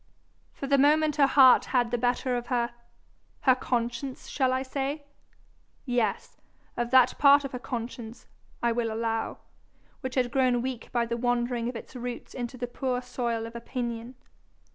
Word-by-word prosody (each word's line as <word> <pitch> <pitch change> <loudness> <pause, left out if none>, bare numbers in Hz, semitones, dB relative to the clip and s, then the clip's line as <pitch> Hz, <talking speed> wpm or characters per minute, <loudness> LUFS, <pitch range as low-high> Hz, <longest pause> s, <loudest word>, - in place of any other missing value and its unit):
For - - -7
the 275 0 +3
moment 300 +2 +4
her 280 -2 +6
heart 265 -2 +7
had 245 -3 +1
the 245 - +1
better 245 +1 0
of 240 0 -4
her 240 -2 0 0.8
conscience, 250 0 0
shall 260 -2 +1
I 260 +1 0
say? 275 +2 -3 0.8
Yes, 240 -6 -1 0.4
of 240 0 -2
that 260 -1 +5
part 285 0 +6
of 275 - -5
her 250 - -5
conscience, 235 -1 -6 0.4
I 235 - +3
will 230 -1 -1
allow, 225 0 -2 0.6
which 260 0 -5
had 250 -2 +1
grown 250 -2 +2
weak 255 -3 -5
by 240 -1 +1
the 235 0 -3
wandering 240 0 0
of 250 - -7
its 230 - -9
roots 245 -1 -6
into 245 0 -5
the 245 - -2
poor 250 0 -2
soil 235 -2 -2
of 230 +1 -9
opinion. 235 0 -5
245 Hz, 165 wpm, -27 LUFS, 235-260 Hz, 0.8 s, heart